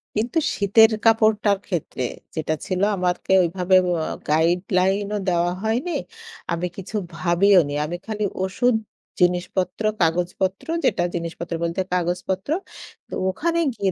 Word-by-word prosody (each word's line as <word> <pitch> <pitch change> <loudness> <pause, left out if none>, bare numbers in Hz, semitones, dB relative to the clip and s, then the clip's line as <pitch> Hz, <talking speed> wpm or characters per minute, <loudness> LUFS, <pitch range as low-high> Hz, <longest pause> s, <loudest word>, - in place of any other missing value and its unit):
কিন্তু 230 +8 -1 0.2
শীতের 220 +3 +5
কাপড়টার 215 -2 +4
ক্ষেত্রে 165 -7 -3 0.3
যেটা 155 -1 -1
ছিল 185 -1 -2
আমারকে 180 0 0
ওইভাবে 180 +2 +1
ওয়া 170 -3 0 0.2
গাইডলাইনও 185 +5 +1
দেওয়া 175 0 +1
হয়নি। 240 +11 0 0.6
আমি 170 +1 -1
কিছু 195 +3 -7 0.2
ভাবিওনি। 170 -1 +3
আমি 170 - -4
খালি 215 -1 -3 0.2
ওষুধ 235 +6 +1 0.4
জিনিসপত্র, 180 +2 0 0.2
কাগজপত্র, 180 - 0 0.2
যেটা 175 - +2
জিনিসপত্র 170 0 -5
বলতে 170 +3 -1
কাগজপত্র 180 +4 -1 0.6
তো - - -12 0.2
ওখানে 335 - -1
গিয়ে 195 -4 -1
185 Hz, 115 wpm, -22 LUFS, 175-205 Hz, 0.6 s, শীতের